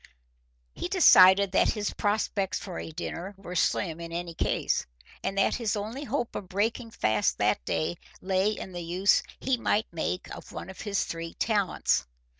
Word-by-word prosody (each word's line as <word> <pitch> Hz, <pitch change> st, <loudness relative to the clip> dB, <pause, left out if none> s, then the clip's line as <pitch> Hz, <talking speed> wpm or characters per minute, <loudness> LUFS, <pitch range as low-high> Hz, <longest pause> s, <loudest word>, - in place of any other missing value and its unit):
He -, -, -4 dB
decided 200 Hz, -, +7 dB
that -, -, +3 dB
his 210 Hz, -2 st, -2 dB
prospects 205 Hz, -2 st, 0 dB
for 185 Hz, -3 st, -6 dB
a -, -, -6 dB
dinner 180 Hz, +5 st, -5 dB
were 180 Hz, -2 st, -8 dB
slim 170 Hz, -1 st, +1 dB
in 170 Hz, 0 st, -7 dB
any 170 Hz, 0 st, -4 dB
case, -, -, 0 dB, 0.4 s
and 195 Hz, -, -2 dB
that 195 Hz, -, +3 dB
his 230 Hz, -3 st, -1 dB
only 220 Hz, +8 st, -4 dB
hope 240 Hz, -1 st, -2 dB
of 185 Hz, -, -6 dB
breaking 225 Hz, +5 st, -1 dB
fast 110 Hz, -, +1 dB
that -, -, +1 dB
day 165 Hz, +2 st, -1 dB, 0.2 s
lay 190 Hz, +2 st, +1 dB
in 210 Hz, -3 st, -5 dB
the 175 Hz, -1 st, -5 dB
use 180 Hz, +4 st, +3 dB, 0.2 s
he 265 Hz, -1 st, +1 dB
might 220 Hz, -2 st, +1 dB
make 170 Hz, +2 st, -2 dB
of -, -, -11 dB
one 190 Hz, -, -7 dB
of 190 Hz, -, -11 dB
his 205 Hz, -2 st, 0 dB
three 165 Hz, 0 st, -6 dB
talents. 200 Hz, -, +1 dB
195 Hz, 175 wpm, -28 LUFS, 175-215 Hz, 0.4 s, decided